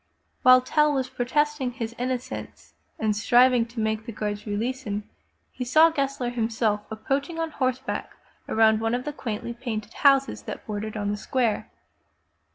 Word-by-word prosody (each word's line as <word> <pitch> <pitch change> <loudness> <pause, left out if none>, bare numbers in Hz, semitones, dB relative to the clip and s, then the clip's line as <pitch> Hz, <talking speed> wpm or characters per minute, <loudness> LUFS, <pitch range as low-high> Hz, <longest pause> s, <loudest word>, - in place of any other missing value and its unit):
While 255 0 +8
Tell 300 +4 +3
was 260 -2 -1
protesting 280 +1 0
his 230 -2 -5
inno 250 +2 -1
cence 250 - -9 0.2
and 215 -1 0
striving 245 +2 +4
to 235 0 -8
make 220 +1 -1
the - - -4
guards 210 0 -4
release 230 +6 -2
him, 205 0 -4 0.4
he 250 - -5
saw 315 +7 +5
Gessler 275 -5 -1
himself 225 -3 0
approaching 275 +9 -2
on 325 -1 -2
horseback 260 -2 -2 0.4
around 220 0 +4
one 225 +1 +1
of 250 - -3
the 295 - -3
quaintly 235 -3 -4
painted 230 -3 -5
houses 275 -1 +3
that - - -7
bordered 215 0 -4
on 205 -1 -1
the 210 - -2
square. 235 0 -1
240 Hz, 165 wpm, -25 LUFS, 220-260 Hz, 0.4 s, While